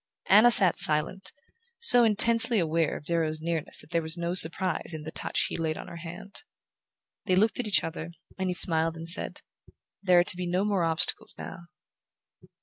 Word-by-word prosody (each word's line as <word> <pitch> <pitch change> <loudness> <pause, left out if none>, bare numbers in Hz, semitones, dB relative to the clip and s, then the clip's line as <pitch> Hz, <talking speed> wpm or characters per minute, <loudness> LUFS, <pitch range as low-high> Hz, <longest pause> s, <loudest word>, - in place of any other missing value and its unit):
Anna 215 +5 +4
sat 195 -6 +9
silent, 155 +5 0 0.5
so 245 - +5
intensely 230 +2 +1
aware 165 -3 -2
of - - -16
Darrow's 160 -2 -3
nearness 165 -1 -6
that - - -21
there 170 -1 -1
was 160 +1 -5
no 170 0 -5
surprise 175 -1 -2
in 155 - -10
the 160 - -9
touch - - -4
he - - -8
laid 160 -1 -4
on - - -11
her 170 - -11
hand. 175 +4 -11 0.8
They 185 - 0
looked 220 +6 -1
at 245 - -4
each 205 - 0
other, 165 0 -8 0.3
and 190 -1 -5
he 180 - -4
smiled 165 -2 +2
and 165 0 -10
said: 170 - +2 0.6
"There 185 -3 +1
are 175 - +4
to 180 - -1
be 180 0 -6
no 180 +3 -2
more 200 -4 -2
obstacles 165 +2 0
now." 170 -2 -11
175 Hz, 190 wpm, -25 LUFS, 165-195 Hz, 0.8 s, sat